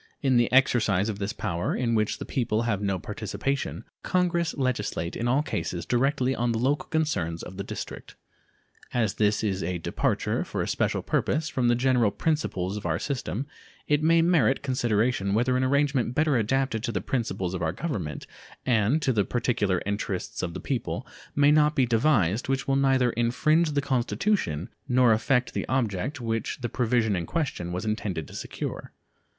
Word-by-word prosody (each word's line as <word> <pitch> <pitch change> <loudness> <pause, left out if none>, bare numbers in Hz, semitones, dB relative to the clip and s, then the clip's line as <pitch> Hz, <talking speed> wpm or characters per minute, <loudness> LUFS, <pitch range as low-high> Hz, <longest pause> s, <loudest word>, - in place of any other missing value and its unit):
In 135 -2 +3
the 120 -1 +2
exercise 110 -6 +3
of 105 -2 -4
this 100 +1 -2
power, 90 -6 -2
in 120 -2 0
which 110 -1 +1
the - - -6
people 115 -3 0
have 105 -4 -1
no 100 -2 0
participation, 135 - -3 0.2
Congress 175 -2 0
legislate 110 - -1
in 120 - -2
all 135 +5 +2
cases 85 - -3
directly 130 +1 +1
on 120 0 0
the - - -1
local 135 +5 0
concerns 100 - -1
of 95 - -9
the 100 - -3
District. - - -7 0.8
As 110 -5 +2
this 105 0 +1
is 95 -3 0
a 90 +2 -2
departure, 85 - -1
for - - -3
a - - -4
special - - 0
purpose, 155 0 0
from 125 -2 0
the 120 - +4
general 125 -3 +3
principles 100 - -1
of 105 - -7
our 80 -1 +1
system, 125 - -3 0.4
it 150 0 +2
may 165 +1 +4
merit 155 -7 +3
consideration 120 -5 +1
whether 125 +3 +2
an 130 - +1
arrangement 135 -2 +1
better 155 -2 +3
adapted 120 0 +1
to 120 - -2
the 100 - -1
principles 95 -7 -2
of 90 - -3
our 80 -1 +1
Government 95 - -4 0.4
and 125 +5 +2
to 130 - +2
the 105 -3 +2
particular 105 -6 0
interests 100 -2 -3
of 85 -1 -4
the - - -4
people 130 -4 -3 0.3
may 145 0 +5
not 150 0 +4
be 135 -4 +4
devised 115 - +2
which 135 -1 0
will 135 - +2
neither 135 -3 +3
infringe 150 +8 +2
the 145 - +1
Constitution 130 - 0 0.2
nor 125 -2 +4
affect 125 +2 +1
the - - -3
object 130 +2 -1
which 115 -2 -2
the 120 - -2
provision 115 -4 +1
in 85 -2 -3
question 130 - -2
was 90 +4 -3
intended 105 -7 -2
to - - -13
secure. - - -6
120 Hz, 180 wpm, -26 LUFS, 100-135 Hz, 0.8 s, may